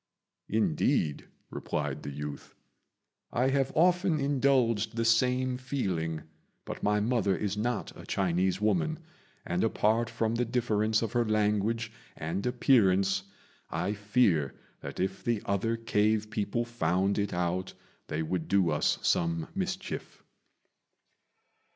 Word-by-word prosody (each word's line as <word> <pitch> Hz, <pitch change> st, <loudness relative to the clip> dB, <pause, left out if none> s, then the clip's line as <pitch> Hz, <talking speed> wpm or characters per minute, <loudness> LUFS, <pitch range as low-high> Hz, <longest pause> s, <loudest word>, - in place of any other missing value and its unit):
"Indeed," 110 Hz, -, +1 dB, 0.2 s
replied -, -, -3 dB
the -, -, -6 dB
youth, 75 Hz, +1 st, -7 dB, 0.8 s
"I 125 Hz, +2 st, +2 dB
have 135 Hz, -1 st, +1 dB
often 175 Hz, -1 st, +3 dB
indulged 130 Hz, -6 st, +2 dB
the 115 Hz, 0 st, 0 dB
same 125 Hz, +2 st, +2 dB
feeling; 95 Hz, -, -2 dB, 0.4 s
but -, -, -6 dB
my 105 Hz, 0 st, +2 dB
mother 105 Hz, -3 st, +1 dB
is 100 Hz, -1 st, -2 dB
not 120 Hz, +4 st, -2 dB
a -, -, -11 dB
Chinese 95 Hz, 0 st, +1 dB
woman, 100 Hz, -7 st, +1 dB, 0.5 s
and, 90 Hz, +1 st, 0 dB
apart 115 Hz, +1 st, +2 dB
from 115 Hz, -1 st, -1 dB
the 120 Hz, +1 st, +1 dB
difference 110 Hz, -2 st, +1 dB
of 110 Hz, -, -2 dB
her 120 Hz, -, +2 dB
language 110 Hz, +1 st, +1 dB, 0.3 s
and 85 Hz, +5 st, -3 dB
appearance, 100 Hz, -6 st, +3 dB, 0.4 s
I 100 Hz, -, -1 dB
fear 100 Hz, -, +2 dB, 0.2 s
that 70 Hz, -, -7 dB
if 95 Hz, +1 st, -2 dB
the 120 Hz, -3 st, +1 dB
other 115 Hz, +4 st, 0 dB
cave 110 Hz, -1 st, +1 dB
people 110 Hz, +2 st, -1 dB
found 100 Hz, -4 st, 0 dB
it 100 Hz, -1 st, -1 dB
out 90 Hz, +2 st, -2 dB, 0.3 s
they 80 Hz, -, -2 dB
would 80 Hz, +1 st, -2 dB
do 95 Hz, -4 st, +3 dB
us 75 Hz, -, +2 dB
some 85 Hz, -1 st, +1 dB
mischief." -, -, -4 dB
105 Hz, 125 wpm, -29 LUFS, 95-120 Hz, 0.8 s, often